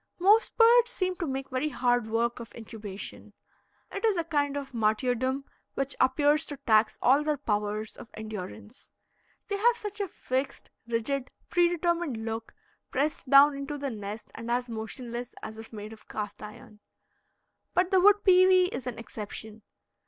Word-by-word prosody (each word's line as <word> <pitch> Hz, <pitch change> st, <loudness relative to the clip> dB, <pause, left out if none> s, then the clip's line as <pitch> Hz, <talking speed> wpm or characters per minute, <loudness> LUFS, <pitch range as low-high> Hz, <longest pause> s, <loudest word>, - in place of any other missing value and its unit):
Most 410 Hz, +5 st, +4 dB
birds 475 Hz, +1 st, +6 dB
seem 370 Hz, -1 st, -1 dB
to 340 Hz, -, -3 dB
make 270 Hz, 0 st, -4 dB
very 260 Hz, +4 st, 0 dB
hard 245 Hz, -5 st, +1 dB
work 235 Hz, +2 st, 0 dB
of 235 Hz, -1 st, -10 dB
incubation. 215 Hz, -3 st, -9 dB, 0.6 s
It 400 Hz, -, -5 dB
is 435 Hz, -4 st, +3 dB
a 335 Hz, -, +1 dB
kind 290 Hz, -3 st, 0 dB
of 275 Hz, -2 st, -6 dB
martyrdom 245 Hz, +4 st, 0 dB, 0.3 s
which 275 Hz, 0 st, -2 dB
appears 290 Hz, +4 st, +3 dB
to 290 Hz, -, -6 dB
tax 220 Hz, -5 st, +3 dB
all 275 Hz, +4 st, +5 dB
their 300 Hz, -1 st, 0 dB
powers 210 Hz, -3 st, -2 dB
of 225 Hz, -, -11 dB
endurance. 215 Hz, +1 st, -8 dB, 0.6 s
They 405 Hz, -, -1 dB
have 475 Hz, +3 st, +3 dB
such 420 Hz, -1 st, -5 dB
a 400 Hz, -, -1 dB
fixed, 265 Hz, -4 st, -3 dB, 0.2 s
rigid, 250 Hz, +3 st, -1 dB, 0.2 s
predetermined 345 Hz, -5 st, +1 dB
look, 225 Hz, 0 st, -5 dB, 0.3 s
pressed 285 Hz, 0 st, -1 dB
down 280 Hz, +1 st, +8 dB
into 280 Hz, +1 st, -5 dB
the 280 Hz, -1 st, -3 dB
nest 210 Hz, 0 st, -7 dB
and 230 Hz, +1 st, -7 dB
as 245 Hz, +1 st, 0 dB
motionless 235 Hz, +2 st, -6 dB
as 220 Hz, 0 st, -7 dB
if 225 Hz, -, -10 dB
made 215 Hz, 0 st, -8 dB
of 220 Hz, -, -16 dB
cast 205 Hz, -1 st, -5 dB
iron. 210 Hz, 0 st, -11 dB, 1.0 s
But 360 Hz, 0 st, +2 dB
the 380 Hz, -1 st, +5 dB
wood 410 Hz, +2 st, +6 dB
pewee 370 Hz, -1 st, +6 dB
is 260 Hz, -, -5 dB
an 245 Hz, -, -4 dB
exception. 220 Hz, -1 st, -7 dB
260 Hz, 160 wpm, -28 LUFS, 225-320 Hz, 1.0 s, down